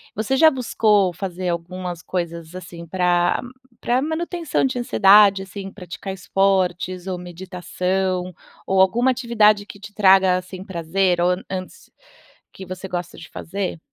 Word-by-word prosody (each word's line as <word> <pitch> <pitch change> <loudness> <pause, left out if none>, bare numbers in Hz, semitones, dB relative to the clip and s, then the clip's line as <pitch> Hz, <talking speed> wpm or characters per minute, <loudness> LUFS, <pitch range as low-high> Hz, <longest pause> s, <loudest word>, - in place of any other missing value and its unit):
você 225 +5 0
já 320 +2 +7
buscou 215 - +2
fazer 180 0 -4
algumas 175 0 -4
coisas, 170 -2 -5
assim, 170 -2 -9
pra 175 0 +1 0.4
pra 245 +2 +1
manutenção 325 0 -1
de 255 -2 -1
ansiedade, 200 -3 +5
assim, 195 0 -8
praticar 190 0 -8
esportes, 185 -1 0
ou 185 -1 -2
meditação, 180 +1 -3 0.3
ou 190 0 +3
alguma 240 +7 +3
atividade 220 -5 +3
que 200 - -11
te 205 +1 -11
traga, 190 -2 +5
assim, 185 0 -8
prazer 180 0 0
ou 175 - +3
an 180 +2 -3
antes 185 -1 -7 0.6
que 190 - -9
você 185 +1 -7
gosta 175 -1 -5
de 160 - -11
fazer? 190 -1 -5
190 Hz, 140 wpm, -21 LUFS, 180-205 Hz, 0.6 s, já